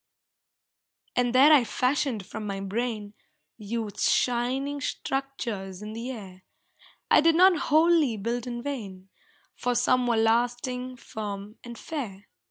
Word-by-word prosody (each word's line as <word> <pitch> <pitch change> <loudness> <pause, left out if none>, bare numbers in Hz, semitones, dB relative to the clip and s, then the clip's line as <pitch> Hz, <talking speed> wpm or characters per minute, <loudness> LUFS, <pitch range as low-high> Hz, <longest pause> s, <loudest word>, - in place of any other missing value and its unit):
And 245 0 +1
there 285 +4 +8
I 280 -5 +6
fashioned 250 -1 0
from 215 +3 -6
my 195 -1 -3
brain 210 +1 -3 0.5
Youth's 215 -1 -1
shining 260 +4 0
structures 230 -10 -4
in 210 +1 -6
the 230 +3 -5
air. 195 -7 -8 0.7
I - - +7
did 330 +1 +4
not 370 +1 +6
wholly 310 -6 +4
build 235 +4 -3
in 240 -1 -5
vain, 200 -9 -6 0.4
For 245 0 -1
some 250 +1 +2
were 235 -2 +2
lasting, 245 +3 0
firm 210 -2 -7
and 235 -1 -9
fair. 210 -11 -6
240 Hz, 130 wpm, -27 LUFS, 210-260 Hz, 0.7 s, there